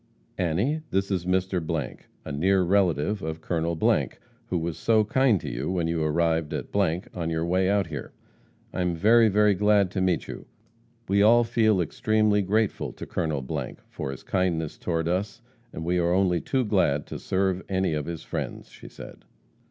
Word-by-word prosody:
Annie, 95 - 0
this 95 +1 -1
is 90 -2 -1
Mr., 90 -4 -1 0.3
a - - -5
near 95 +6 +2
relative 90 0 +1
of 80 +1 -4
Colonel, 85 0 -1 0.7
who 90 - -1
was 85 -1 -3
so 110 -1 +3
kind 120 -1 +2
to - - -8
you 60 +5 -3
when 90 -3 0
you 85 -1 -1
arrived 80 0 0
at, - - -6 0.4
on 85 -2 -3
your 80 0 -1
way 95 +2 +1
out 100 -1 +2
here.' 75 -6 -7 0.6
'I - - -2
am 90 -1 0
very, 110 +5 +5
very 105 +1 +4
glad 100 -1 +3
to 95 - -2
meet 90 -2 0
you. - - -8 0.6
We 100 +1 +3
all 115 +3 +6
feel 115 -4 +2
extremely 105 +4 +1
grateful 105 +2 0
to - - -8
Col., 80 -6 -2 0.5
for - - -5
his 70 - -7
kindness 85 -4 -1
toward 80 -2 -1
us, 100 +6 -2 0.3
and 80 - -6
we 90 +1 +1
are 85 0 +2
only 90 -3 +2
too 130 -2 0
glad 85 -9 +1
to - - -7
serve 95 -1 0
any 95 -3 0
of 75 0 -3
his 85 -2 -5
friends,' - - -5
she - - -13
said. - - -12
90 Hz, 175 wpm, -26 LUFS, 80-100 Hz, 0.7 s, all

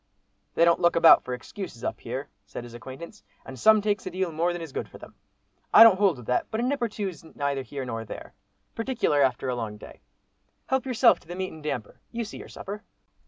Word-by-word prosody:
"They 170 - +5
don't 170 0 +4
look 175 -1 +3
about 165 0 +7
for 125 - -3
excuses 125 - -9
up - - -3
here," 130 +4 -5 0.2
said - - -7
his 120 -1 -11
new - - -7
acquaintance, 135 - -10 0.2
"and 130 -1 -9
some 215 - +5
takes 205 -1 0
a - - -1
deal 185 -1 -2
more 165 +3 0
than 175 - -4
is 165 -4 -7
good - - -5
for - - -12
them. - - -13 0.6
I 225 - +10
don't 210 -4 +7
hold 195 -8 +3
with 125 - -11
that, 125 - 0
but 220 - -3
a - - 0
nip 275 +1 -1
or 235 - +1
two's 195 -7 -5
neither 140 -3 -3
here 135 0 -6
nor 115 -2 -4
there, 115 - -9 0.4
particular 230 - 0
after 130 -1 +1
a 125 - -1
long 110 -3 -5
day. - - -13 0.6
Help 265 0 -1
yourself 245 -1 +4
to - - -24
the 175 - -6
meat 185 0 -4
and 160 - -11
damper, 135 -8 -5
you 235 -1 -3
see 215 - -9
your - - -10
supper." 205 +2 -7
170 Hz, 240 wpm, -26 LUFS, 130-210 Hz, 0.6 s, I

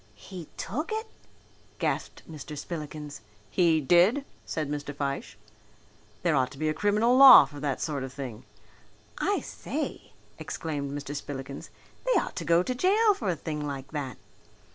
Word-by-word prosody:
"He 160 - -10
took 300 - -3
it!" 440 +1 -2 0.7
gasped - - -2
Mr. 150 -1 -8
Spillikins. 150 -4 -6 0.3
"He 165 +5 +4
did," 180 - +4 0.2
said 155 -2 -2
Mr. 145 0 -4
Fyshe. 140 -5 -3 0.9
"There 170 -3 +3
ought 130 -2 +2
to - - -13
be 155 +2 -1
a - - +1
criminal 210 +7 +2
law 270 - +11
for 145 +1 -11
that 140 -3 -2
sort 145 -4 -2
of 130 - -6
thing." 130 -5 -7 0.8
"I - - +1
say!" - - -5 0.3
exclaimed 145 -4 -4
Mr. 145 0 -5
Spillikins, 140 -1 -6 0.3
"they - - +3
ought - - -5
to 170 - -3
go 170 +2 +4
to 255 - -2
jail 410 - +4
for 220 - -3
a 175 - +1
thing 155 0 -5
like 140 -2 -5
that." 140 -6 -4
150 Hz, 160 wpm, -28 LUFS, 140-190 Hz, 0.9 s, law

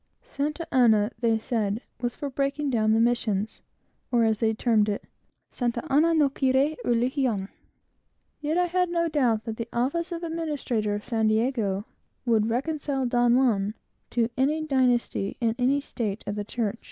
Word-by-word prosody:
Santa 315 - -3
Ana, 225 -4 +4
they 230 -2 +2
said, 220 -2 -1 0.2
was 240 0 -2
for 285 -1 -5
breaking 275 +1 -1
down 215 -3 +2
the 225 - +3
missions; 225 -3 0 0.5
or, 240 -2 +3
as 220 -1 +2
they 225 -1 +2
termed 220 -1 +2
it 205 - -2 0.5
"Santa 240 -2 -2
Ana 325 +4 +4
no 300 -3 +4
quiere 270 +2 +1
religion." 240 -4 0 0.9
Yet 305 +3 -1
I 360 - +3
had 360 0 +1
no 335 -1 +1
doubt 250 -8 +1
that 225 -1 -5
the 230 0 -5
office 305 +9 -1
of 340 0 -4
administrador 295 -10 -2
of 205 - -6
San 225 -3 +1
Diego 215 -3 0 0.4
would 225 -2 +2
reconcile 275 +2 -1
Don 240 0 +3
Juan 215 -5 +2 0.3
to 235 0 0
any 300 +4 +1
dynasty, 250 -7 +1
and 230 -3 +1
any 265 +3 +3
state 220 -7 -4
of 205 - -3
the 205 0 -4
church. 225 0 -2
240 Hz, 165 wpm, -26 LUFS, 220-285 Hz, 0.9 s, Ana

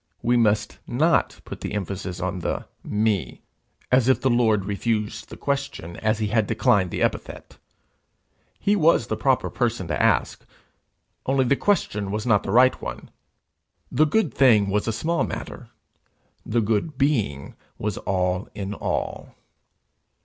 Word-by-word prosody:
we 120 +1 +3
must 105 -2 +1
not 155 +7 +1
put - - -8
emphasis 95 -2 -4
on 95 0 -2
the - - -3 0.2
me, 105 - -1 0.5
as 130 -1 +4
if 130 - +4
the 130 - +1
Lord 110 -5 +2
refused 105 +2 -2
the - - -9
question, 140 - -3
as 110 0 0
he 105 -1 -1
had 110 -1 +1
declined 100 -4 +2
the - - -2
epithet: - - -4 1.0
he 205 - +2
was 165 - +4
the - - -2
proper 135 -2 +1
person 120 -7 -1
to 75 - 0
ask, - - +1 0.8
only 135 0 +2
the 140 - +3
question 105 - 0
was 105 +2 -3
not 110 -4 +3
the - - -6
right 125 +5 +4
one: - - -7 0.8
the 155 - +4
good 165 +2 +1
thing 110 -7 +4
was 105 +2 0
a - - +2
small 160 +10 0
matter; - - -6 0.7
the 115 +1 0
good 115 +7 -1
Being 115 - 0 0.2
was 105 -2 -3
all 90 0 -1
in 100 0 -4
all. - - -4
110 Hz, 150 wpm, -24 LUFS, 100-130 Hz, 1.0 s, as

